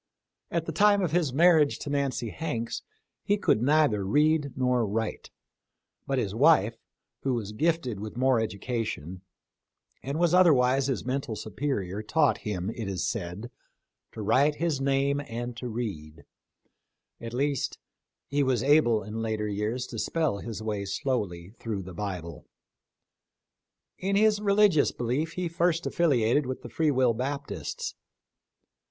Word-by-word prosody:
At 170 -1 -1
the 165 - -3
time 205 +4 +4
of 170 - 0
his 165 -5 +1
marriage 160 0 +4
to - - -6
Nancy 140 -5 -1
Hanks 120 -8 -3 0.4
he 205 - +2
could 115 - +2
neither 140 -6 +3
read 150 +7 +2
nor 125 -2 +2
write; 110 +1 -3 0.8
but 135 - 0
his 105 -6 -1
wife, 115 -3 +4 0.5
who 135 -2 0
was 105 -3 -4
gifted 130 -3 0
with 110 +2 -7
more 130 -1 +3
education, 105 - -3 0.8
and 140 +3 -4
was 170 0 +2
otherwise 135 -7 +5
his 135 -4 -2
mental 130 -2 -2
supe 110 - -9
rior, 105 -9 -1
taught 145 +7 +2
him, 100 -1 -3
it 115 -3 -5
is 95 -2 -2
said, 105 +2 -4 0.6
to 110 - -6
write 145 +8 +3
his 155 -4 -1
name 140 +1 +1
and 120 +1 -5
to 125 - -5
read 95 -10 -5 0.5
— - - -41
at 115 -1 -6
least, 140 +1 -1 0.5
he 145 +1 0
was 130 -4 +1
able 135 -7 +4
in 110 +3 -5
later 110 -1 -2
years 105 +5 -2
to 115 -3 -7
spell 155 -9 0
his 110 -1 -6
way 105 -2 -2
slowly 100 -4 -3
through 105 -4 -4
the 90 0 -9
Bible. 85 -4 -6 1.5
In 195 +2 0
his 210 0 +4
relig 205 -1 +4
ious - - +3
belief 130 +7 -2
he 180 -1 -2
first 170 0 0
affiliated 140 -4 +2
with 130 - -5
the - - -7
Free 160 -1 +1
Will 130 -4 +3
Baptists. 140 +5 -4
125 Hz, 150 wpm, -27 LUFS, 110-150 Hz, 1.5 s, otherwise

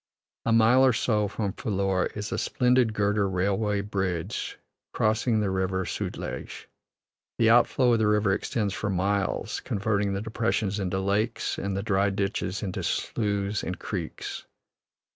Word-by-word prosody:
A - - +3
mile 115 +3 +5
or 130 -2 +5
so 105 -3 +1
from 100 -1 -3
Phillour 95 -5 0
is 105 0 -4
a - - -1
splendid 125 -2 +2
girder 100 -1 +1
railway 100 +2 0
bridge 95 -5 -3 0.4
crossing 110 +1 +2
the 100 -2 0
River 95 0 0
Sutlej. - - -5 0.7
The 115 -1 +4
overflow 120 +1 +4
of 115 - +3
the 110 - +3
river 105 -2 +3
extends 100 0 -1
for 105 - -3
miles, 95 +1 0
converting 100 -1 -1
the 100 - -2
depressions 110 -2 -1
into 95 -1 -1
lakes 105 +4 -1
and 95 0 -2
the 100 - -2
dry 100 -2 +2
ditches 100 0 -2
into 95 -3 -3
sloughs 100 -1 -1
and 90 - -4
creeks. 90 -6 -5
100 Hz, 145 wpm, -27 LUFS, 95-110 Hz, 0.7 s, mile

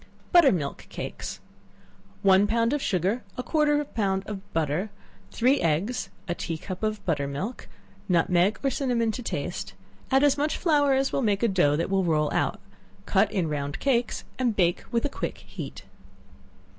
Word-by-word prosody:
Butter 345 -6 +7
milk 145 -7 -3
Cakes. - - -6 0.8
One 195 +1 +5
pound 230 +3 +2
of 295 - 0
sugar, 195 +4 0 0.2
a 250 - -2
quarter 300 0 +2
of 295 - +2
a - - -4
pound 195 -7 -1
of 200 -1 -8
butter, 165 +5 0 0.4
three 255 +4 +2
eggs, 170 +10 0 0.2
a 175 - 0
tea 165 -1 -4
cup 185 +3 -7
of 215 -2 -2
butter 145 -5 0
milk, 185 - -5 0.4
nutmeg 180 +3 +3
or 275 - +2
cinnamon 240 -5 0
to 250 - -5
taste; 235 - -4 0.3
add 270 +1 +4
as 285 -1 +4
much 300 +1 0
flour 290 -5 +3
as 270 0 +1
will - - +1
make 210 -3 +1
a - - +5
dough 180 -8 +3
that 165 +5 -1
will 195 -1 +2
roll 155 -3 +1
out; - - 0 0.5
cut - - +2
in 180 -5 0
round 145 -1 -3
cakes 245 -4 0 0.2
and 245 -4 +1
bake 175 -3 +2
with 235 +2 +1
a - - +4
quick 280 - -4
heat. - - -8
210 Hz, 180 wpm, -26 LUFS, 175-255 Hz, 0.8 s, Butter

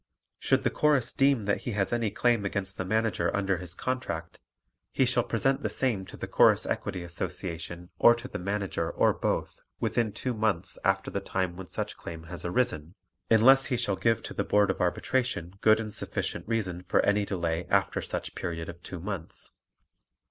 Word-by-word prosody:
Should - - +2
the - - +1
Chorus 150 -5 +2
deem 135 -5 +3
that 100 - 0
he 120 - -4
has 100 +2 0
any 115 -2 +1
claim 115 +1 +2
against 95 -1 -2
the - - -1
Manager 110 +3 +1
under 95 -2 +1
his 85 -1 -6
contract, 105 -11 -4 0.5
he 135 - +3
shall 125 0 +3
present 135 +4 +1
the - - -1
same 110 -8 -1
to - - -10
the - - -4
Chorus - - +4
Equity 90 - -3
Association 85 0 -5
or 120 - +7
to 120 +2 -7
the - - -6
Manager 95 -3 -2
or - - +3
both - - -2 0.2
within 115 -3 0
two 125 +4 -3
months 105 -5 -1
after 95 0 +1
the 100 - -1
time 95 -2 -2
when 95 0 -8
such - - -4
claim 80 -1 -8
has 85 +2 -6
arisen, 85 -4 -1 0.3
unless 130 +5 +6
he 125 - 0
shall 110 -5 0
give 115 +3 +1
to - - -6
the - - -1
Board 105 -1 +3
of 95 - -5
Arbitration 90 -1 0
good 110 0 +5
and 110 -2 -4
sufficient - - -3
reason 100 -6 -1
for 90 - +2
any 100 0 +3
delay 85 -4 -2
after - - +2
such - - -4
period 80 -1 -4
of 85 0 -9
two 90 +1 -7
months. 95 -2 -7
100 Hz, 190 wpm, -28 LUFS, 90-115 Hz, 0.5 s, or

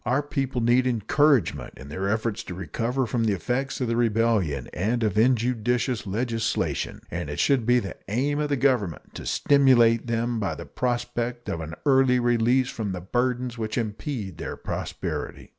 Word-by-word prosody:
Our 130 +5 +1
people 135 -3 -2
need 120 +2 +3
encouragement 130 +4 +2
in 65 +2 -10
their 95 +6 -2
efforts 110 +1 -1
to 90 - -6
recover 115 - -2
from 115 0 0
the 105 - +2
effects 130 +9 -2
of 125 - 0
the 115 - 0
rebellion 110 - +1
and 115 +7 0
of 105 -4 0
injudicious 120 0 +1
legislation, 115 +2 -1
and 85 -2 -4
it 75 - -4
should 130 -5 +2
be 125 0 +5
the 100 -5 -3
aim 135 +8 0
of 150 -1 -1
the 140 - +1
Government 120 - 0
to - - -7
stimulate 120 -5 +4
them 115 0 -1
by 100 - -1
the - - -8
prospect 120 -1 -2
of 85 - -2
an 80 +1 -6
early 130 -2 +4
release 120 +1 +2
from 105 -4 -3
the 90 - -5
burdens 125 +4 -1
which 110 -1 -3
impede 110 - -4
their - - -5
prosperity. - - -5
120 Hz, 175 wpm, -25 LUFS, 110-125 Hz, -, be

